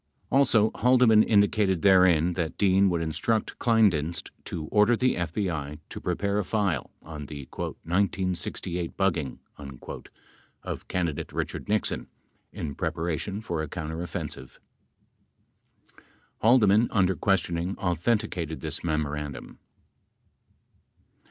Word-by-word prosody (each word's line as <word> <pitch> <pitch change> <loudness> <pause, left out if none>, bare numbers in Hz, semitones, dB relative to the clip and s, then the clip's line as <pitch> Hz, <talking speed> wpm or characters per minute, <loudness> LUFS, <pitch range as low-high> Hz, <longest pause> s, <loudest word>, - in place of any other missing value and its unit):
Also, 115 -5 +4
Haldeman 125 -3 +5
indicated 100 -4 +2
therein 90 -3 +5
that 85 -3 -3
Dean 95 -1 +4
would 85 -2 0
instruct 110 +8 -1
Kleindienst 95 -9 +2
to 80 -2 -5
order 105 +3 +4
the 130 +1 +2
FBI 85 -4 -3
to - - -7
pre 90 - -1
pare 100 +2 0
a - - 0
file 95 - -1
on 75 -3 -8
the 70 -3 -8
"1968 90 -1 -2
bugging" 85 -9 0 1.3
of - - -6
candidate 85 -6 -2
Richard - - -4
Nixon 105 0 0 0.4
in 75 -3 -5
prepa 80 +4 -3
ration 95 +5 -3
for 85 -7 -3
a 80 - -3
counteroffensive. 80 -4 -6 1.4
21 - - -23 0.3
Haldeman, 110 -1 +5
under 95 -2 +2
questioning, 90 -1 0
authenti 100 +5 0
cated 80 -4 -5
this - - -3
memorandum. 75 -3 -3
90 Hz, 115 wpm, -27 LUFS, 80-105 Hz, 1.4 s, Haldeman